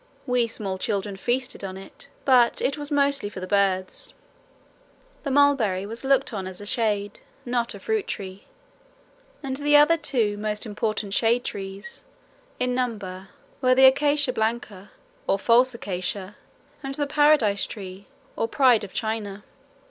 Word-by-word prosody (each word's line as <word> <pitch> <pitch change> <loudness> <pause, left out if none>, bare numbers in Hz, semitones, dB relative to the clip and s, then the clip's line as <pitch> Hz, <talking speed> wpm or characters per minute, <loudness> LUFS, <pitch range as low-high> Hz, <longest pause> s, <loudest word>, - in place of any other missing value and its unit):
We 250 -3 +2
small 195 -4 -4
children 200 0 -2
feasted 245 +4 -2
on 190 -1 -5
it, 195 +7 -11 0.2
but 250 -3 +4
it 275 - 0
was 290 -1 -3
mostly 280 -6 +1
for 205 - -8
the 185 - -5
birds. 190 -1 0 1.1
The 280 - -4
mulberry 265 -9 +3
was 230 +4 -7
looked 270 -1 +2
on 190 -3 -4
as 185 -1 -8
a 205 - -8
shade, 210 -3 -1 0.3
not 240 -1 -1
a - - -9
fruit 440 -3 -1
tree, 190 0 -6 1.0
and 265 -1 -3
the 295 +1 +3
other 300 +3 +6
two 240 -9 0
most 210 +1 -2
important 210 -1 -2
shade 235 +3 +2
trees, 195 +5 -6 0.6
in 250 0 0
number, 205 -7 -3 0.3
were 255 -1 +4
the 265 +1 +7
acacia 285 0 +4
blanca, 220 -3 -3 0.4
or 195 - +2
false 245 +4 +4
acacia, 190 -1 -4 0.5
and 270 -1 -4
the 290 - 0
paradise 285 -8 +3
tree 195 -2 -9 0.3
or 225 - -1
pride 245 -3 +4
of 200 - -8
China. 210 -2 -3
225 Hz, 150 wpm, -25 LUFS, 200-265 Hz, 1.1 s, the